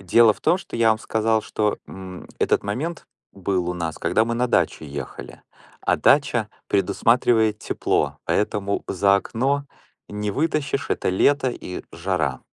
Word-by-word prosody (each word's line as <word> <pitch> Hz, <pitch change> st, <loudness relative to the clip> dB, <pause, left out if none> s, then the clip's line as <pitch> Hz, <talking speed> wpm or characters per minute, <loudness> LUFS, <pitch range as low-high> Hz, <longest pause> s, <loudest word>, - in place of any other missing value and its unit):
Дело 110 Hz, +4 st, +5 dB
в -, -, -18 dB
том, 180 Hz, -, +3 dB
что -, -, -8 dB
я 115 Hz, -1 st, +4 dB
вам 110 Hz, -, +2 dB
сказал, 110 Hz, 0 st, +1 dB
что, 105 Hz, -1 st, -1 dB
м, 95 Hz, -1 st, -9 dB
этот -, -, +2 dB
момент 140 Hz, +12 st, -4 dB, 0.3 s
был 95 Hz, -2 st, -1 dB
у 90 Hz, -, -2 dB
нас, 85 Hz, -2 st, -4 dB
когда 110 Hz, -, +2 dB
мы 115 Hz, 0 st, -2 dB
на 125 Hz, +1 st, +1 dB
дачу 80 Hz, -, +1 dB
ехали. 70 Hz, 0 st, -8 dB, 0.4 s
А -, -, +1 dB
дача 125 Hz, -6 st, +3 dB, 0.2 s
предусматривает 110 Hz, +2 st, +2 dB
тепло, -, -, -1 dB
поэтому 100 Hz, -1 st, 0 dB
за 100 Hz, +1 st, +3 dB
окно 135 Hz, +7 st, -1 dB, 0.4 s
не 105 Hz, 0 st, -3 dB
вытащишь- 145 Hz, +1 st, -1 dB
это -, -, 0 dB
лето 130 Hz, +8 st, +3 dB
и 90 Hz, -, -7 dB
жара. 85 Hz, -7 st, -1 dB
105 Hz, 155 wpm, -23 LUFS, 95-120 Hz, 0.4 s, Дело